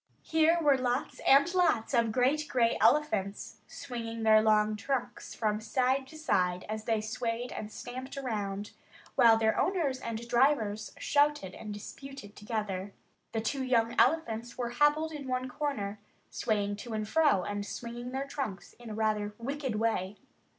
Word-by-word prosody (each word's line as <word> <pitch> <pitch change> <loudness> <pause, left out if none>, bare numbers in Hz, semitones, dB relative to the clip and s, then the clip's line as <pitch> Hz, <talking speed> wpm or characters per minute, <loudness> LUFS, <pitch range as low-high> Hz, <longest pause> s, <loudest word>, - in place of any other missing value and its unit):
Here 320 +1 +3
were 285 -4 +4
lots 250 +1 -1
and 280 +6 +6
lots 350 -11 +2
of 230 -2 +3
great 270 +6 +2
gray 235 -2 +2
elephants, 215 -10 +1
swinging 230 -3 -6
their 215 0 +6
long 215 0 +3
trunks 250 +4 -3
from 215 -1 0
side 260 +3 +1
to 315 - -12
side 180 - 0
as 215 0 -4
they 225 -2 +1
swayed 230 +2 -3
and 215 0 -6
stamped 255 +4 -7
around, 205 -6 -3 0.4
while 225 -1 +6
their 220 0 +2
owners 320 -9 0
and 230 0 -5
drivers 235 -5 +2
shouted 290 -10 +1
and 215 - -8
disputed 210 +1 -9
together. 210 -3 -4 0.4
The 225 - -1
two 265 +4 -2
young 235 -3 +2
elephants 235 -7 +1
were 240 -2 -2
hobbled 295 +5 +2
in 290 -3 -7
one 255 0 -1
corner, 235 -7 -3 0.3
swaying 205 -3 -1
to 230 +2 -7
and 215 -1 -2
fro 295 - +3
and 205 +1 -3
swinging 235 +3 -6
their 265 +1 -2
trunks 265 -9 -5
in 225 -3 -7
rather 210 -1 0
a - - -14
wicked 275 -2 -2
way. 210 -3 -1
235 Hz, 155 wpm, -30 LUFS, 215-275 Hz, 0.4 s, and